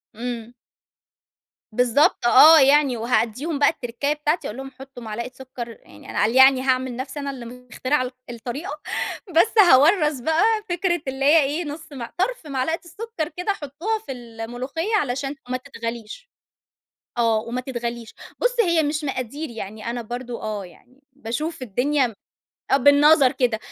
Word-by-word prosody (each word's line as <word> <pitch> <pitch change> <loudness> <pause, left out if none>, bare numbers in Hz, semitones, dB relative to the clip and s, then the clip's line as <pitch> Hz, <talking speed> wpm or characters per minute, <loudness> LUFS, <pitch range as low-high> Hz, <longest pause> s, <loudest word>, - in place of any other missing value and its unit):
إمم. 235 0 -5 1.2
بالضبط 250 +4 +2
آه 310 +6 +9
يعني، 275 -2 +4
وهادّيهم 245 +6 -1
بقى 285 - +5
التركّاية 255 +1 -2
بتاعتي، 300 +2 -1
أقول 215 - -7
لهم 270 0 -7
حطّوا 265 -2 -12
معلقة 235 +3 -5
سُكّر 255 -2 -8
يعني - - -16
قال 225 +4 +2
يعني 265 0 +7
أنا 265 - -2
هاعمل 255 -1 +1
نَفْسي 260 +4 -6
أنا 280 -1 -3
اللي 255 -3 -9
مخترعة 250 +3 -2
ال 250 - -5 0.2
الطريقة، 255 +6 -6 0.5
بس 420 +7 +4
هاورّث 310 -4 +5
بقى 320 +8 +1 0.3
فكرة 350 -1 0
اللي 265 +1 -2
هي 310 +3 +6
إيه، 295 +5 -2
نُص 300 +1 -8
مع 250 -5 -7
طَرْف 435 -2 -1
معلقة 280 +4 -1
السُكّر 375 -2 -5
كده 360 +3 0
حطّوها 330 +8 -3
في - - -6
الملوخيّة 245 - -4
علشان 275 -4 -1
ما 255 - -1
تتغليش. 235 - -7 0.9
آه 230 -2 +3
وما 235 +3 -4
تتغليش. 240 -3 -5 0.2
بُص، - - 0
هي 340 -6 +3
مش 300 +1 -2
مقادير 275 +2 -4
يعني 220 0 -6
أنا 240 0 -4
برضه 240 +1 -6
آه، 210 -2 -4
يعني 250 +9 -18
باشوف 280 +4 -5
الدنيا 255 +5 +1
م 230 - -7 0.6
آه - - +5
بالنظر 285 0 +5
كده. 250 -5 0
265 Hz, 155 wpm, -23 LUFS, 240-300 Hz, 1.2 s, آه